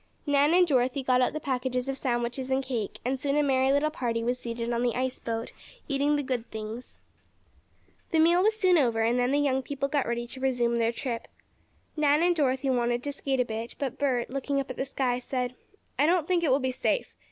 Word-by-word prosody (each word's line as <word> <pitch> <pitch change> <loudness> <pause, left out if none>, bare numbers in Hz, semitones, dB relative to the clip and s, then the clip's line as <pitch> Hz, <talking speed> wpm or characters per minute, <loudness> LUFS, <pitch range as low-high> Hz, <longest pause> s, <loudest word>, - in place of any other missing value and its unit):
Nan 290 +2 +3
and 360 0 +6
Dorothy 260 -3 +1
got 255 0 +3
out 250 - +2
the 310 - -4
packages 255 -2 -2
of 270 - -1
sandwiches 245 0 -2
and 265 +1 +1
cake, 240 -6 -3
and 260 +1 -1
soon 280 +1 0
a 295 - +3
merry 265 -1 +2
little 290 +2 +2
party 235 -6 -2
was 245 +2 0
seated 235 0 -3
on 235 - 0
the 245 -1 0
ice 255 0 -2
boat, 230 0 -4 0.3
eating 285 +1 +1
the 290 - -1
good 250 -3 -3
things. 220 +3 -7 1.1
The 330 - +1
meal 340 +3 +5
was 435 +2 +2
soon 365 -4 +4
over 230 -5 +2
and 235 +2 +2
then 245 0 +2
the 280 - +2
young 275 -2 +1
people 275 +1 -3
got 280 -1 0
ready 235 0 -2
to 260 +2 -5
resume 245 -3 +1
their 230 0 +2
trip. 235 -1 -4 0.7
Nan 300 +1 +3
and 350 0 +3
Dorothy 270 -3 +1
wanted 240 -1 0
to 285 - -2
skate 270 -2 -1
a - - 0
bit, 225 +1 -5
but 270 -4 -4
Bert 255 -4 0
looking 275 +1 -1
up 270 -1 -3
at - - -7
the 265 - -1
sky, 255 -2 -1
said: 250 0 -3 0.5
"I 295 - +4
don't 340 -2 +2
think 355 -2 +1
it 315 - +2
will 260 - +5
be 260 -2 -1
safe. 375 - -1
260 Hz, 230 wpm, -27 LUFS, 245-285 Hz, 1.1 s, and